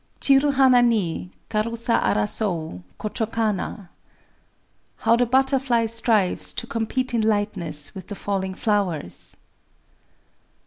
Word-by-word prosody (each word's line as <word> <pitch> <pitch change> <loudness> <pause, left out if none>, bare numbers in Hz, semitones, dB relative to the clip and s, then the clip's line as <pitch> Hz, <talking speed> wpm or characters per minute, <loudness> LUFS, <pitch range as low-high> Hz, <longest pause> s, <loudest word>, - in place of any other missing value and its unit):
_] - - -38
Chiru 275 +1 +4
hana 260 -2 +6
ni— 205 -7 0 0.2
Karusa 230 +2 0
arasoü 155 - -1 0.2
Kochō 220 +1 -2
kana! 210 -4 -2 1.1
[_How 225 +1 +5
the 245 0 +2
butterfly 260 -2 +2
strives 225 -4 +1
to - - -3
compete 240 +3 -2
in 230 - +2
lightness 195 -9 0
with 190 -2 -9
the 205 - -6
falling 190 -2 -3
flowers! 185 - -2
220 Hz, 115 wpm, -23 LUFS, 190-235 Hz, 1.1 s, hana